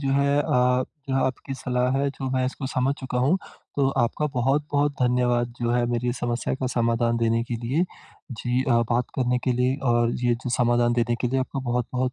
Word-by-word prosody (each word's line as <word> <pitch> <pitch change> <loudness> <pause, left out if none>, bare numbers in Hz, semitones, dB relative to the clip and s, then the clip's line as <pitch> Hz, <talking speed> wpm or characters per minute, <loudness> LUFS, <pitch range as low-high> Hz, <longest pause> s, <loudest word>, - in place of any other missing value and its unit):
जो 135 -2 -1
है 140 +1 +2
अ, - - +3 0.7
जो 135 - 0
आपकी 130 +1 -3
सलाह 125 -1 0
है 140 +1 +1
जो 135 -1 -5
मैं 130 0 +1
इसको 130 +1 -4
समझ 130 +1 0
चुका 130 -1 -3
हूँ। 140 +9 +3 0.4
तो 140 -2 +3
आपका 120 +6 0
बहुत-बहुत 145 +3 +1
धन्यवाद 120 -1 +1
जो 120 -1 0
है 120 0 +2
मेरी 120 0 0
समस्या 120 -2 -2
का 130 0 -3
समाधान 115 0 +1
देने 115 0 +1
के 120 - -4
लिए। 150 +9 +2 0.5
जी 125 +2 -1
अ, 120 -3 +3
बात 120 +1 +1
करने 125 -1 +1
के 130 - +2
लिए 125 +2 +1 0.2
और 120 0 +3
ये 120 - +3
जो 125 +1 -5
समाधान 120 0 +3
देने 120 0 +1
के 125 - +1
लिए 130 +2 0
आपका 135 +1 -3
बहुत-बहुत 125 +1 -1
125 Hz, 205 wpm, -25 LUFS, 120-135 Hz, 0.7 s, अ